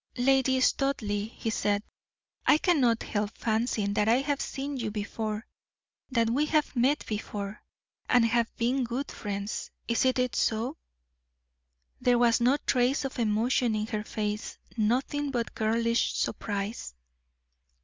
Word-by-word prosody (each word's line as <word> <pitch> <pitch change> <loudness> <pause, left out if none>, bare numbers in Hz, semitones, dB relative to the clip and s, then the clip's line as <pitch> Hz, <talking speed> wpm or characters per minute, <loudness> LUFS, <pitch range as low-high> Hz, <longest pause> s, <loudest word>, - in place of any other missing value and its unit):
"Lady 265 +1 +3
Studleigh," 220 -6 +1
he 225 -1 -4
said, 205 -1 0 0.6
"I 300 - +7
cannot 270 -10 +2
help 205 0 -2
fancying 220 -2 0
that 210 0 +1
I 230 - +6
have 285 0 -1
seen 275 +1 -4
you 230 -4 -2
before 215 +1 -4 0.6
that 230 -3 +2
we 275 +7 +1
have 305 -2 +1
met 260 +5 +2
before, 205 -1 -5 0.5
and 245 -2 +5
have 235 0 +2
been 250 +3 +1
good 245 +4 -3
friends. 200 0 -4 0.2
Is 235 - +2
it 255 -1 +1
so?" 230 +7 0 1.2
There 245 -1 +3
was 235 -1 +4
no 255 +4 +4
trace 255 +2 +2
of 265 - -5
emotion 230 +1 +2
in 215 0 -1
her 215 -1 -3
face 210 0 -3 0.2
nothing 255 +6 0
but 240 -4 -2
girlish 230 +1 +1
surprise. 200 - -3
235 Hz, 135 wpm, -28 LUFS, 215-260 Hz, 1.2 s, I